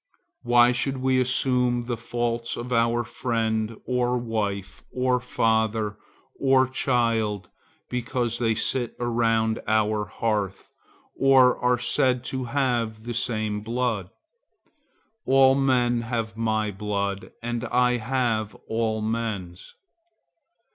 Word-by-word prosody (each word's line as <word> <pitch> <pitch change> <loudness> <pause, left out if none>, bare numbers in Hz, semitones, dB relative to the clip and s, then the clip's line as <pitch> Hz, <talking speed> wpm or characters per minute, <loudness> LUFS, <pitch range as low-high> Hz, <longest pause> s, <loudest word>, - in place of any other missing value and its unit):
Why 120 0 +5
should 130 +2 -1
we 130 0 +2
assume 125 -1 +1
the 120 0 -2
faults 120 0 -3
of 125 +1 -4
our 115 0 +2
friend, 115 -2 -2
or 125 0 0
wife, 105 -5 -3
or 125 0 +1
father, 110 -3 0 0.4
or 130 -1 +4
child, 115 -7 0 0.4
because 120 -1 -2
they 115 -2 +1
sit 120 +2 0
around 115 -2 +1
our 110 -1 +1
hearth, 105 -4 -3 0.4
or 130 -2 +5
are 125 0 +3
said 125 +1 +2
to 130 -1 -2
have 120 -4 -1
the 120 +1 -4
same 110 -3 -1
blood? 115 -4 -2 1.2
All 135 0 +6
men 125 -3 +2
have 115 -2 -3
my 110 -2 0
blood 100 0 -3
and 120 0 -3
I 125 +1 +2
have 115 -3 -1
all 110 -1 -1
men's. 110 -6 -4
115 Hz, 115 wpm, -25 LUFS, 110-125 Hz, 1.2 s, All